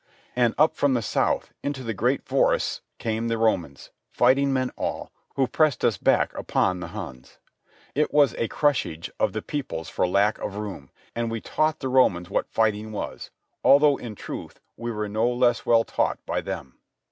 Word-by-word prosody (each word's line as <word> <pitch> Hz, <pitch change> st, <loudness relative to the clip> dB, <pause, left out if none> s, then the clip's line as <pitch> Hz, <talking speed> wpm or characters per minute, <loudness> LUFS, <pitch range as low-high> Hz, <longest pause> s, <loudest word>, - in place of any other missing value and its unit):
And 120 Hz, -2 st, +2 dB
up 155 Hz, +2 st, +4 dB
from 140 Hz, -2 st, +2 dB
the 120 Hz, -, 0 dB
south -, -, 0 dB
into 140 Hz, -2 st, -3 dB
the 115 Hz, -2 st, -3 dB
great 125 Hz, +6 st, 0 dB
forests -, -, +1 dB, 0.2 s
came 115 Hz, +1 st, -2 dB
the 115 Hz, 0 st, 0 dB
Romans, 90 Hz, -11 st, -1 dB, 0.2 s
fighting 135 Hz, +3 st, +3 dB
men 130 Hz, -1 st, 0 dB
all, -, -, -4 dB, 0.2 s
who 135 Hz, -, +3 dB
pressed 150 Hz, -1 st, +1 dB
us 110 Hz, -, +2 dB
back -, -, +2 dB
upon 90 Hz, -1 st, 0 dB
the -, -, -5 dB
Huns. 65 Hz, 0 st, -9 dB, 0.6 s
It 150 Hz, +2 st, +1 dB
was 145 Hz, -5 st, +4 dB
a 115 Hz, -, +1 dB
crushage 125 Hz, -, 0 dB
of -, -, +1 dB
the -, -, -4 dB
peoples 125 Hz, -, -4 dB
for -, -, 0 dB
lack 100 Hz, +4 st, +2 dB
of 100 Hz, -, -5 dB
room; 100 Hz, -10 st, -6 dB, 0.3 s
and 115 Hz, 0 st, -1 dB
we 115 Hz, 0 st, -3 dB
taught 155 Hz, +7 st, 0 dB
the 135 Hz, -, -2 dB
Romans 110 Hz, -10 st, +2 dB
what -, -, -1 dB
fighting 110 Hz, -1 st, 0 dB
was, 105 Hz, -, -5 dB, 0.3 s
although 145 Hz, 0 st, +6 dB
in 115 Hz, -3 st, -7 dB
truth -, -, -8 dB, 0.2 s
we 120 Hz, 0 st, -4 dB
were 105 Hz, -1 st, -3 dB
no 110 Hz, +3 st, +1 dB
less 120 Hz, -1 st, +1 dB
well 115 Hz, -1 st, +5 dB
taught -, -, 0 dB
by -, -, -1 dB
them. 65 Hz, -, -7 dB
115 Hz, 180 wpm, -25 LUFS, 105-130 Hz, 0.6 s, although